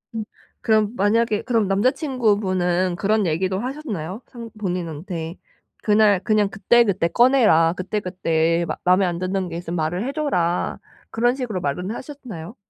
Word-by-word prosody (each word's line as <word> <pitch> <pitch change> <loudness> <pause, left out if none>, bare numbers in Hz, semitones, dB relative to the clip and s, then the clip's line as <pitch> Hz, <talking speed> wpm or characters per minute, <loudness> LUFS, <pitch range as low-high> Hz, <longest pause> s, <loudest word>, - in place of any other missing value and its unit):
음 220 - -2 0.4
그럼 215 -1 +2
만약에 210 +1 +1
그럼 230 -5 +1
남자 200 +6 +3
친구분은 195 - 0
그런 210 +3 +1
얘기도 185 +3 0
하셨나요? 230 - -5
상 235 -2 -9
본인한테. 170 -3 -4 0.5
'그날 210 -2 +4
그냥 215 -3 +2
그때그때 205 -3 +2
꺼내라. 225 -9 +4
그때그때 175 -3 -1 0.2
맘에 185 +2 +4
안 175 -1 -2
드는 185 +1 -2
게 165 - -5
있으면 175 0 -5
말을 175 +5 -1
해 - - -2
줘라.' 180 - -1 0.3
그런 240 +2 +2
식으로 235 -9 -3
말은 180 +6 -2
하셨나요? 240 - -8
195 Hz, 320 characters per minute, -22 LUFS, 175-230 Hz, 0.5 s, 그날